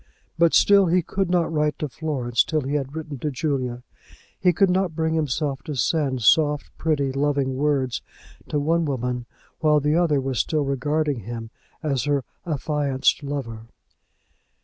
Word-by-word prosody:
But 170 0 +4
still 200 -2 +6
he 175 +1 +2
could 190 +2 -2
not 175 -2 +1
write 150 -1 +1
to 150 - -2
Florence 130 -5 0
till 155 -2 -1
he 135 +1 -3
had 140 0 -2
written 155 -4 -6
to 150 - -2
Julia. 130 -3 -2 0.6
He 180 - +4
could 185 +2 +3
not 185 -3 0
bring 160 0 0
himself 145 -2 -1
to 150 - -4
send 135 -3 0
soft, 150 +4 +3
pretty, 145 -4 +1
loving 140 -1 0
words 135 -3 0 0.5
to 150 - 0
one 165 +3 +1
woman 125 -3 -2 0.3
while 150 -1 +4
the 150 +1 +1
other 165 -5 +3
was 130 -2 -2
still 155 -2 +1
regarding 145 +1 0
him 115 +1 -7 0.3
as 140 -4 0
her 145 -2 +1 0.2
affianced 145 -3 0
lover. 125 -6 -5
145 Hz, 160 wpm, -23 LUFS, 130-160 Hz, 0.6 s, still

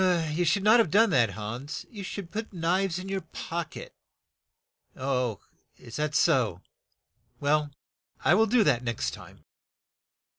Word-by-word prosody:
"You 175 +3 0
should 190 +4 +2
not 220 +3 +6
have 225 - +3
done 215 +5 +4
that, 120 -6 +4
Hans; 115 +8 -6
you 210 - -8
should 190 -2 -6
put 220 +2 -5
knives 180 +1 0
in 185 +1 -6
your 195 0 -2
pock 165 +1 -6
et." - - -9 1.8
"Is 115 - -11
that 150 0 -1
so? 125 - +2 0.8
Well, 150 +1 +1 0.6
I 155 - +6
will 220 +4 +4
do 230 +1 +4
that 140 -9 +3
the 125 - -12
next 115 -2 -1
time. - - -13
165 Hz, 150 wpm, -28 LUFS, 145-200 Hz, 1.8 s, not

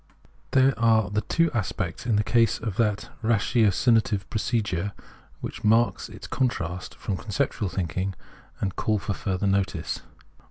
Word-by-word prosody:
There 130 0 +4
are 110 -2 +3
the 105 +1 +1
two 165 +9 +1
aspects 100 -1 -2
in 115 - +3
the 105 - +3
case 115 0 +3
of 110 -4 -4
that 105 -3 0
ratio 110 0 +3
cinative 105 -1 +2
procedure 105 -4 -1 0.5
which - - -6
mark 115 +2 +3
its - - -10
contrast 90 - -2
from 95 - -3
con - - -12
ceptual 105 -2 0
thinking 95 +2 -2 0.4
and 95 -2 -2
call 110 -1 +1
for 100 0 -2
further 95 -1 -2
notice. 95 -4 0
105 Hz, 150 wpm, -26 LUFS, 95-115 Hz, 0.5 s, There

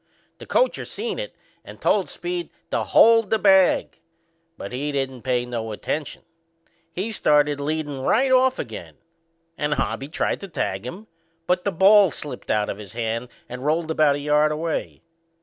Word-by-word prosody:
The - - -11
coacher - - +1
seen 460 +4 -4
it - - -6 0.3
and - - -12
told - - +1
Speed 350 0 -4 0.2
to - - 0
hold 225 -2 +5
the 220 - +3
bag; 190 -3 +3 0.6
but - - -7
he 140 +4 -3
didn't 135 -3 -3
pay 125 -1 0
no 115 -2 -4
attention. 145 +7 -4 0.7
He 195 +7 -3
started 150 -7 +2
leadin' 145 -1 -3
right 260 - +2
off 260 0 +4
again 90 - -7 0.6
and 150 0 0
Hobby 135 - -2
tried 150 - -1
to 200 - -6
tag 105 - -3
him, 190 +11 -8 0.4
but 180 +1 0
the 200 - +1
ball 195 +3 +6
slipped 145 -5 -8
out 105 -1 +1
of 100 - -5
his 105 0 -10
hand 115 +1 -3 0.2
and 125 +1 -7
rolled 160 +2 0
about 155 -3 +3
a - - -4
yard 150 +1 +2
away. 160 +1 -3
150 Hz, 165 wpm, -23 LUFS, 125-195 Hz, 0.7 s, ball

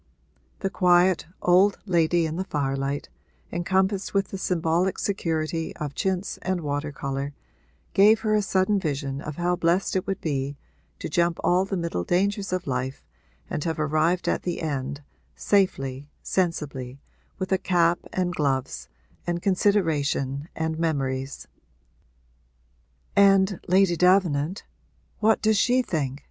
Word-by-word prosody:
The 195 - -1
quiet 180 -1 +3 0.2
old 185 +3 +4
lady 170 -2 +2
in 160 0 -3
the 185 - -2
firelight, 140 -4 -2 0.4
encompassed 190 +3 0
with 195 -1 +1
the 195 - -5
symbolic 175 +1 0
security 165 -4 -2
of 150 -3 -5
chintz 190 +3 -2
and 185 -2 -1
water 145 0 -2
colour, 140 0 -4 0.6
gave 210 +3 +6
her 215 -2 +1
a 210 - +3
sudden 195 +1 +1
vision 140 -4 -3
of 150 -1 -6
how 175 +2 0
blessed 175 +3 +1
it 185 +1 -1
would 195 0 -2
be 140 -2 -2 0.4
to - - -5
jump 170 +1 +1
all 180 +2 +3
the 195 -1 -3
middle 170 - -2
dangers 195 - 0
of 185 -1 -2
life 130 0 -3 0.4
and 150 - -3
have 160 -2 -2
arrived 155 +4 +1
at - - +1
the 175 -2 -3
end, 145 -1 -3 0.3
safely, 145 -9 0
sensibly, 140 -8 -2 0.4
with 185 0 -4
a 190 - +3
cap 175 -2 +2
and 180 -1 -1
gloves 135 - -1 0.4
and 175 0 -2
consideration 160 -7 +1
and 160 0 -2
memories. 135 -4 -2 1.7
'And, 195 -1 +5
Lady 185 -1 +4
Davenant, 180 -2 +2 0.6
what 220 0 +3
does 220 -1 +3
she 250 +4 +3
think?' 145 - -2
170 Hz, 135 wpm, -25 LUFS, 145-190 Hz, 1.7 s, gave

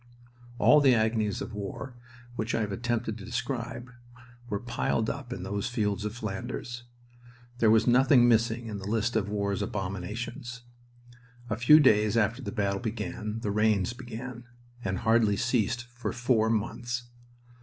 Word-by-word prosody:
All 150 +4 +6
the 135 -3 +6
agonies 110 -2 0
of 115 - -8
war 105 +6 -6 0.4
which 110 +1 -2
I - - +1
have 105 -2 -2
attempted 115 +1 -2
to - - -9
describe 125 +1 -4 0.6
were 100 -1 -1
piled 115 -1 -1
up 135 -3 -8
in 95 -7 -5
those 100 +2 -2
fields 105 -4 -1
of 105 +1 -4
Flanders. 120 +2 -5 0.7
There 110 - +5
was 110 0 +5
nothing 125 0 +5
missing 115 0 +2
in 105 -3 -5
the 100 - -7
list 115 +2 0
of 100 -2 0
war's 100 -1 -1
abominations. 105 +5 -5 0.9
A - - +2
few 120 +8 +7
days 110 -6 +4
after 115 +4 +1
the 105 -5 -5
battle 100 -3 -1
began 110 -1 -4
the 105 - -1
rains 105 0 +2
began, 120 0 -8 0.4
and 95 -1 -1
hardly 110 -1 +3
ceased 120 -1 0
for 120 0 -3
four 120 -3 +2
months. 120 +2 -2
115 Hz, 155 wpm, -28 LUFS, 105-120 Hz, 0.9 s, few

